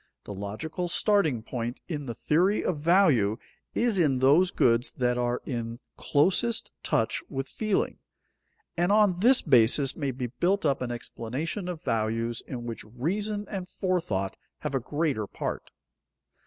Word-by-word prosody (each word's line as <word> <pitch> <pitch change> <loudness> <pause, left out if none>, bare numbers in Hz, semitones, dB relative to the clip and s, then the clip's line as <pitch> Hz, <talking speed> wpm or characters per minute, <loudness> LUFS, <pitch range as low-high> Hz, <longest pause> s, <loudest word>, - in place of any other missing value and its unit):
The 100 - -7
logical 110 - -4
starting 170 - +2
point 120 0 -4
in 145 -5 -4
the 120 - -4
theory 180 - +2
of 165 -5 -1
value 150 - +4 0.4
is 230 -5 +2
in 145 -6 +3
those 145 +8 +5
goods 115 -4 +2
that 125 -1 +1
are 120 0 -1
in 115 -2 -4 0.2
closest 195 +10 +1
touch - - 0
with 135 -1 -3
feeling, 215 +4 -1 0.8
and 175 +3 +1
on 205 -4 +4
this 245 +6 +5
basis 130 0 +4
may 140 -3 -2
be 130 -1 -3
built 175 - 0
up 140 -2 +1
an 125 - -2
explanation 130 - -4
of 175 -3 -5
values 115 0 -1
in 120 -2 -6
which 115 -2 -5
reason 200 - -2
and 190 -3 -5
forethought 165 - -1 0.2
have - - -3
a 135 - +2
greater 140 -4 -1
part. - - -5
140 Hz, 150 wpm, -27 LUFS, 120-180 Hz, 0.8 s, those